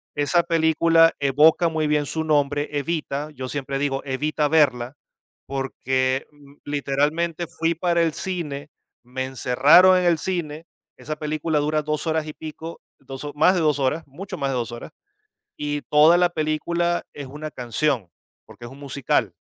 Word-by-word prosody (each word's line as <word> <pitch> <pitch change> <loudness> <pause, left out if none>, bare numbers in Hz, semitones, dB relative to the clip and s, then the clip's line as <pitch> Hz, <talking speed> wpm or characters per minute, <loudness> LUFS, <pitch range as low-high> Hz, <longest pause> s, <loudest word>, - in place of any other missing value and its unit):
Esa 145 +4 +2
película 165 0 +4
evoca 150 +5 +4
muy 160 -1 -1
bien 150 -1 +1
su 160 +2 -3
nombre, 145 -1 +1
Evita, 150 -1 -3
yo 130 -3 -7
siempre 135 -1 -3
digo: 135 -1 -1
"Evita 150 +3 -1
verla", 135 -5 +2 0.5
porque 130 -1 -1 0.4
literalmente 150 +4 -1
fui 165 +2 -1
para 170 0 +1
el 165 - +1
cine, 150 -7 -5 0.3
me 130 +2 -5
encerraron 140 +8 +5
en 180 - +1
el 170 -2 +3
cine. 165 -4 -4 0.3
Esa 155 - -5
película 155 0 -1
dura 150 +1 0
2 150 +1 -2
horas 160 -1 0
y 155 - -6
pico, 160 +2 -9 0.2
2, 135 +2 -8
más 180 +5 +4
de 175 - +1
2 150 -3 +2
horas, 140 +5 -1
mucho 180 +9 -8
más 140 -1 -1
de - - -2
2 120 -2 -3
horas, 120 - -9 0.7
y 145 0 -3
toda 155 +3 +5
la 175 0 +3
película 170 +2 -1
es 140 -2 -8
una 150 +3 -7
canción, 125 - -1 0.4
porque 120 - -13
es 120 - -9
un 135 - -13
musical, 140 -2 -1
150 Hz, 160 wpm, -23 LUFS, 140-165 Hz, 0.7 s, encerraron